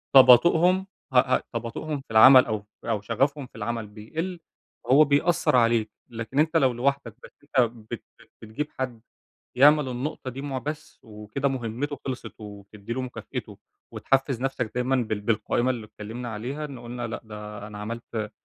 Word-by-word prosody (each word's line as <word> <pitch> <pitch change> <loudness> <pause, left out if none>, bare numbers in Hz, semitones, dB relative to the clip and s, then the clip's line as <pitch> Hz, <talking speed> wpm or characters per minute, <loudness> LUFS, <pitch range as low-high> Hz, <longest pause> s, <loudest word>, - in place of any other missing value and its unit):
تباطؤهم 170 +9 +7 0.3
ه - - +3
ه 130 0 +2
تباطؤهم 120 +6 -4
في 135 - -18
العمل 130 +4 +9
أو 110 -2 -3 0.2
أو 105 - -1
شغفهم 135 +6 -1
في - - -26
العمل 115 0 -3
بيقل، 160 - -5 0.5
هو 145 +4 +8
بيأثّر 150 +2 +2
عليك، 115 -3 +3 0.2
لكن 115 +4 -4
أنت 160 +2 +3
لو 130 -4 +3
لوحدك 125 -2 -1
بس - - -12
أنت 125 -5 +2 0.2
بت - - -5 0.2
بت - - -20
بتجيب 115 +7 -4
حد 120 -4 -3 0.6
يعمل 145 +1 +6
النقطة 130 +1 -4
دي 130 +2 -7
مُع 140 -2 -4
بس 150 +3 -6
وكده 105 +5 -4
مهمته 135 +2 -3
خلصت 130 -2 -5
وتدّي 105 +1 -8
له 130 - -2
مكافئته، 125 - -7 0.4
وتحفّز 135 -2 0
نفْسك 130 -4 -2
دايمًا 125 +2 +1
بال 110 -4 -1
بالقائمة 115 +3 0
اللي 115 -4 -6
اتكلّمنا 110 +3 -7
عليها، 130 +8 -4
إن 135 -4 -8
قُلنا 120 0 -5
لأ 115 - -5
ده 105 -1 -8
أنا 105 -1 -9
عملت 110 0 -5
125 Hz, 165 wpm, -26 LUFS, 110-140 Hz, 0.6 s, العمل